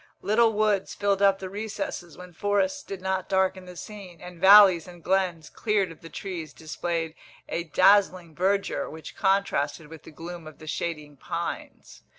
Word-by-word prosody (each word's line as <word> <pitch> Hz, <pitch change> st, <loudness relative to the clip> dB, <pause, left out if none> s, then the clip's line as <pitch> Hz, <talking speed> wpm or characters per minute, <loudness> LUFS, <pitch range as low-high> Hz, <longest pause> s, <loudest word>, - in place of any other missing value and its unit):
Little 225 Hz, +2 st, +4 dB
woods 210 Hz, -2 st, +1 dB
filled 200 Hz, -1 st, +1 dB
up 195 Hz, -1 st, +5 dB
the 190 Hz, -, -6 dB
recesses 200 Hz, -4 st, -5 dB
when 180 Hz, -1 st, -11 dB
forests 200 Hz, +1 st, 0 dB
did 190 Hz, -2 st, -8 dB
not 190 Hz, 0 st, -2 dB
darken 190 Hz, -1 st, +1 dB
the 180 Hz, 0 st, -11 dB
scene, 190 Hz, -3 st, -10 dB
and 180 Hz, -1 st, -11 dB
valleys 190 Hz, -4 st, +8 dB
and 175 Hz, -2 st, -13 dB
glens, 185 Hz, -4 st, 0 dB
cleared 205 Hz, -5 st, 0 dB
of 165 Hz, -, -14 dB
the 165 Hz, -, -10 dB
trees, 165 Hz, -7 st, -6 dB
displayed 165 Hz, 0 st, -3 dB, 0.3 s
a 170 Hz, -, -3 dB
dazzling 185 Hz, -1 st, +3 dB
verdure 195 Hz, +4 st, 0 dB
which 160 Hz, -1 st, -10 dB
contrasted 160 Hz, -7 st, 0 dB
with 160 Hz, -1 st, -11 dB
the -, -, -13 dB
gloom 170 Hz, +1 st, -9 dB
of 155 Hz, -, -12 dB
the 155 Hz, -, -12 dB
shading 150 Hz, -2 st, -4 dB
pines. -, -, -6 dB
185 Hz, 165 wpm, -26 LUFS, 165-195 Hz, 0.3 s, valleys